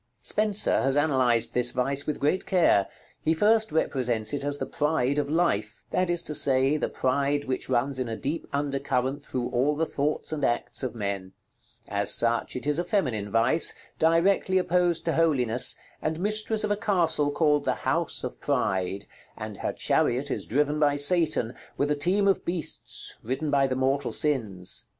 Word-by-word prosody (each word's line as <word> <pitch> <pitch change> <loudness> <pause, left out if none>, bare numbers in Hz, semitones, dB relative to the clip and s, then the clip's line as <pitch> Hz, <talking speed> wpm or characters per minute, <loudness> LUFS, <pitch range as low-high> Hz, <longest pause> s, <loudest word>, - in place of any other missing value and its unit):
Spenser 215 -1 +1
has 135 +1 +1
analyzed 130 -6 +2
this 125 0 +2
vice 135 +3 -1
with 150 - -2
great 150 +7 0
care. 165 - +3 0.3
He 160 +1 +1
first 220 +3 +2
represents 125 -7 0
it 145 - -2
as 145 0 -1
the - - -3
Pride 150 -2 0
of 145 -1 -2
life; 170 +3 0
that 185 -1 0
is 175 -1 0
to 150 - -5
say, 135 0 +2
the 155 - -1
pride 140 +2 0
which 130 0 -3
runs 130 +2 0
in 125 -2 -2
a 115 - -3
deep 145 +8 -4
under 140 -1 -1
current 135 +1 -2
through 125 -3 -3
all 130 +4 +1
the 160 +2 0
thoughts 150 +1 -2
and 155 -2 -3
acts 120 - -1
of 130 -3 -4
men. 100 -3 -4 0.5
As 100 0 -1
such, 115 0 +1
it 125 - -5
is 150 +2 +1
a - - 0
feminine 130 - -1
vice, 115 +9 +2 0.2
directly 180 +4 +3
opposed 180 -2 +1
to 165 - 0
Holiness, 130 -8 +3 0.3
and 155 +1 -2
mistress 215 +2 0
of 210 - -1
a - - +3
castle 175 -9 +1
called 150 -1 +1
the - - +1
House - - 0
of - - -6
Pryde, 95 +1 -1 0.3
and - - -7
her - - -2
chariot 130 +4 0
is - - -3
driven 145 +4 0
by 145 -1 +3
Satan, 150 -5 +3 0.2
with 145 +1 0
a - - +2
team 190 +7 +1
of 195 - +2
beasts, 175 -1 -2
ridden 135 +6 -3
by 140 -1 +3
the 130 - -2
mortal 135 +1 0
sins. 110 -12 -1
145 Hz, 180 wpm, -26 LUFS, 125-165 Hz, 0.5 s, care